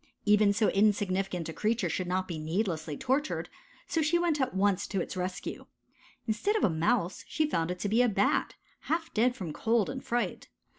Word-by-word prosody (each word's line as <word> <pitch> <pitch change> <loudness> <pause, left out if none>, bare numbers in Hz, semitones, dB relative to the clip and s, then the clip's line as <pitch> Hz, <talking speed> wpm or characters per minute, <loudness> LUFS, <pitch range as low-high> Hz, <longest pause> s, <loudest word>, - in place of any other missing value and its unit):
Even 210 -1 +5
so 210 +1 +2
insignificant 195 -4 +1
a 160 - -5
creature 215 0 0
should 180 +2 -2
not 185 +1 -1
be 165 -3 -4
needlessly 160 -2 -2
tortured, 270 +4 -1 0.4
so 325 - 0
she 315 +3 +3
went 335 -4 +1
at 260 -4 -1
once 200 0 +2
to 195 - -2
its 180 - -4
rescue. 185 0 -4 0.6
Instead 240 - 0
of 435 - +1
a 185 - +4
Mouse 170 +4 0
she 315 - +1
found 165 - 0
it 180 - -3
to 205 - -2
be 220 +4 +3
a 245 - +4
Bat, 200 -1 +1 0.3
half 325 +1 -1
dead 245 +3 +2
from 180 -10 -5
cold 225 +1 +1
and 265 - -6
fright. 240 0 -2
205 Hz, 195 wpm, -30 LUFS, 180-245 Hz, 0.6 s, Even